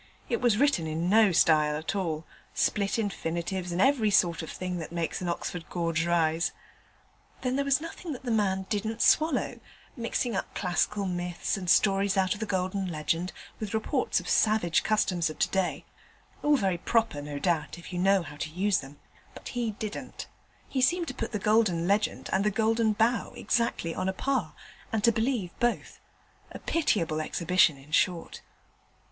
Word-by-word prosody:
It - - 0
was 240 -4 +3
written 270 - +2
in 165 +3 -1
no 215 -2 +6
style 155 -3 +4
at 160 +5 -4
all 165 -5 -2 0.3
split 200 0 +1
infinitives, 180 -3 -3
and 175 - -2
every 250 -2 +4
sort 175 -5 +3
of 160 - -7
thing 180 -1 -4
that 160 - -7
makes 170 0 -2
an 180 - -2
Oxford 170 0 -4
gorge 165 -1 -1
rise. 165 -1 +1 0.9
Then 255 0 0
there 280 - +1
was 275 0 +3
nothing 330 +1 -7
that 255 - -9
the 245 - -2
man 190 -3 +1
didn't 220 +2 -1
swallow: 310 -3 +2 0.4
mixing 235 0 -2
up - - -4
classical 195 +2 0
myths, 175 -1 -2
and 185 -3 -4
stories 195 +1 +3
out 190 -1 +3
of 205 - -9
the 220 - -3
Golden 190 0 -1
Legend 165 +2 -1 0.3
with 215 0 -3
reports 220 - 0
of - - -10
savage 215 -6 +3
customs 185 -6 +1
of 155 - -8
today 190 -2 0 0.6
all 295 0 +4
very 190 -6 0
proper, 225 -8 +1
no 145 0 -6
doubt, 165 +1 -1
if 175 +2 -10
you 175 - -2
know 195 0 +3
how 145 -1 -10
to 155 - -4
use 190 +4 +1
them, 140 +1 -11 0.4
but - - -8
he 240 -2 -2
didn't: 215 0 -6 0.4
he 265 - -1
seemed 340 +6 +2
to - - -5
put 230 -3 -4
the 215 - -1
Golden 205 -5 +2
Legend 205 +2 0
and 190 - +2
the 210 - +3
Golden 220 +1 +2
Bough 225 +3 +1
exactly 230 -8 0
on 185 +2 -1
a - - -1
par, 210 - -1 0.4
and 220 -2 -1
to 235 - +6
believe 225 -5 -1
both: 240 0 -1 0.5
a - - -7
pitiable 170 - 0
exhibition, 170 -1 +2
in 135 +3 -16
short. 170 +1 0
190 Hz, 180 wpm, -28 LUFS, 170-220 Hz, 0.9 s, no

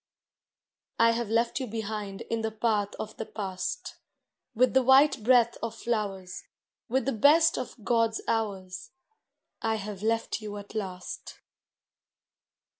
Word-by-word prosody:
I 230 0 +5
have 230 -2 -2
left 230 +3 +1
you 260 - -3
behind 210 -3 -4
In 230 -1 -3
the 220 - -1
path 215 -2 0
of 215 - -6
the 220 - -4
past, 200 - -4 0.6
With 255 +3 +3
the 265 - +5
white 265 +1 +5
breath 240 0 +4
of 230 -1 -3
flowers. 200 -6 -3 0.5
With 265 +3 +1
the 275 - +1
best 315 +8 +5
of 255 - -5
God's 230 -2 +2
hours, 190 -5 -2 0.7
I 225 0 +1
have 210 -2 -6
left 225 +1 0
you 210 -1 -6
at 205 0 -10
last. 185 -4 -6
220 Hz, 135 wpm, -28 LUFS, 205-235 Hz, 0.7 s, I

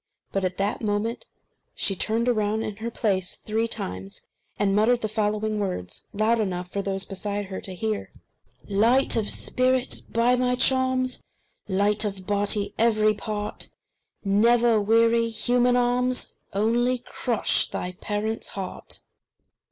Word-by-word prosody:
But 195 - -1
at 185 -1 -1
that 200 +2 -1
moment 215 +2 -1 0.5
she 195 - +1
turned 225 +5 +1
round 215 -2 +1
in 210 -1 -5
her 225 +2 -4
place 195 -5 -1
three 220 +2 -1
times, 95 - -6 0.3
and 200 -1 +2
muttered 235 +3 +3
the 215 - 0
following 215 0 -1
words, 180 - -4
loud 220 +3 +2
enough 180 -3 -2
for 200 - -1
those 195 -1 -2
beside 205 +1 -3
her 190 0 -6
to 190 - -8
hear: 215 +2 -3 0.6
"Light 230 +7 +3
of 220 -2 +1
spirit, 255 0 +1
by 235 +2 +3
my 250 0 +1
charms, 260 0 +2 0.5
Light 205 +2 +2
of 195 -3 -4
body, 205 +1 +1
every 215 -2 +4
part, 210 0 -4 0.6
Never 230 +2 +4
weary 230 +2 +3
human 245 +2 +2
arms 250 +1 +1 0.2
Only 235 +5 +2
crush 235 -4 +1
thy 180 - -4
parents' 210 +4 -3
heart!" 190 -1 -6
215 Hz, 135 wpm, -25 LUFS, 200-235 Hz, 0.6 s, every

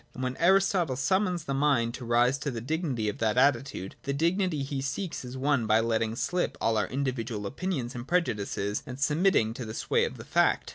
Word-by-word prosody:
And 130 - -5
when 130 0 -2
Aristotle 180 -4 +3
summons 180 +5 +1
the 140 - -3
mind 135 -5 +2
to 125 - -7
rise 120 +3 +3
to 145 - -2
the 120 -4 -4
dignity 135 -3 -2
of 105 - -3
that 110 -1 +1
attitude, 135 -7 +1
the 140 - -2
dignity 165 0 +1
he 135 0 -3
seeks 145 +6 -3
is 125 +1 -7
won 135 -4 +1
by 110 +1 +4
letting 115 -1 0
slip 175 +9 -1
all 115 - +1
our 105 -3 +1
individual 120 -5 -3
opinions 135 - -3
and 120 +1 -7
pre 180 +1 +4
judices, 105 - -3
and 125 +1 -7
submitting 150 - +2
to 125 - -6
the 110 -1 -6
sway - - +1
of - - -6
the - - -10
fact. - - +2
130 Hz, 210 wpm, -28 LUFS, 115-155 Hz, -, by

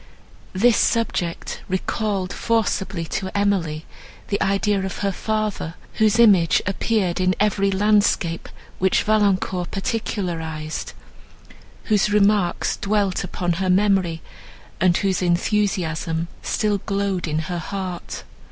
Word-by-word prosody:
This 220 +4 +4
subject 185 -7 -1
recalled 190 0 -1
forcibly 195 -6 -1
to 190 +4 -3
Emily 175 -6 0 0.4
the 200 - -1
idea 195 0 +1
of 190 - -4
her 200 - +2
father, 215 -5 -2 0.3
whose 215 0 +4
image 195 -8 +5
appeared 195 -2 0
in 185 0 +2
every 200 -1 +2
landscape, 195 -4 +1 0.3
which 190 0 +2
Valancourt 195 -4 +1
particularized, 170 -7 -3 0.9
whose 210 -1 +2
remarks 205 -3 +2
dwelt 200 -2 0
upon 175 -1 -2
her 185 - 0
memory, 185 -4 +2 0.6
and 180 -1 +3
whose 195 -2 0
enthusiasm 175 -3 0
still 210 -2 0
glowed 195 -3 -2
in 155 0 -1
her 170 +2 -3
heart. 185 0 -5
195 Hz, 110 wpm, -22 LUFS, 175-210 Hz, 0.9 s, image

